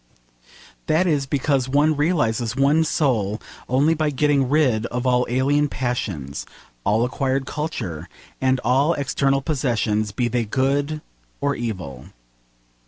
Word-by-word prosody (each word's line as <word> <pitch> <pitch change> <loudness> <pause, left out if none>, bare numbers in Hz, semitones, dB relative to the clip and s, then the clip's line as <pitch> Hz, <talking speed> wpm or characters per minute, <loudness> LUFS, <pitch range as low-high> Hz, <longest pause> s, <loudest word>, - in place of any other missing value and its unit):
That 160 +4 +3
is 145 -6 +1
because 135 -2 0
one 150 +3 +3
realises 125 -7 0
one's 145 +3 +3
soul 110 -8 0 0.3
only 140 +6 +3
by 155 -1 0
getting 140 -2 +2
rid 130 -7 +2
of 125 +2 -4
all 125 -1 +2
alien 140 +4 +2
passions, 100 - -3 0.4
all 110 +4 +2
acquired 135 +1 -1
culture, 95 - -4 0.3
and 130 0 +2
all 135 +7 +3
external 135 0 0
possessions, 115 -8 0
be 120 +4 0
they 120 0 0
good 140 +6 0 0.4
or 140 0 0
evil. 90 - -5
130 Hz, 125 wpm, -22 LUFS, 115-145 Hz, 0.4 s, That